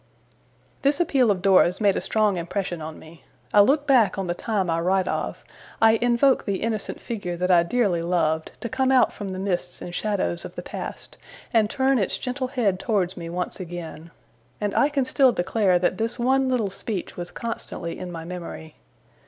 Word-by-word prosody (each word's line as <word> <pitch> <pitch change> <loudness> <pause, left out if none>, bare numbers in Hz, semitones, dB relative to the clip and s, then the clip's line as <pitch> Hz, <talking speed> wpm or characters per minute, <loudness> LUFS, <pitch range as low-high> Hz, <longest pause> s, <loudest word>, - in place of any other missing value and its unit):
This 280 +1 +2
appeal 270 -8 +3
of 190 -3 0
Dora's 185 -2 +4
made 205 -3 +3
a - - -1
strong 215 -3 +2
impression 175 0 -3
on 155 0 -7
me. 160 +1 -15 0.3
I 205 - +8
look 285 +7 +3
back 240 -10 +4
on 195 - -2
the 175 - -1
time 200 0 -1
I 165 0 0
write 185 +2 +1
of; - - -3 0.4
I 225 0 +5
invoke 245 +3 +3
the 200 0 -2
innocent 220 -2 -3
figure 190 -7 -4
that 180 +1 +1
I 175 -1 +6
dearly 195 -2 +1
loved, 165 -2 0
to - - -3
come 260 +2 +1
out 260 -2 +4
from 205 -2 -6
the 185 - -5
mists 180 -2 -3
and 175 - -7
shadows 195 -4 -1
of - - -9
the - - -6
past, - - -7 0.4
and 220 -2 +3
turn 265 0 +2
its 195 - 0
gentle 255 +1 -3
head 230 -8 0
towards 195 -6 0
me 170 -2 -7
once 180 +3 -4
again; 170 -2 -7 0.5
and 205 -1 -1
I 285 - +4
can 280 -3 0
still 260 0 +4
declare 185 0 +2
that 180 +1 0
this 230 +2 -1
one 260 +2 +2
little 230 -6 0
speech 195 0 -5
was 175 0 -6
constantly 230 -7 -5
in 180 -1 -6
my 165 -1 -7
memory. 170 -3 -8
200 Hz, 195 wpm, -24 LUFS, 175-240 Hz, 0.5 s, I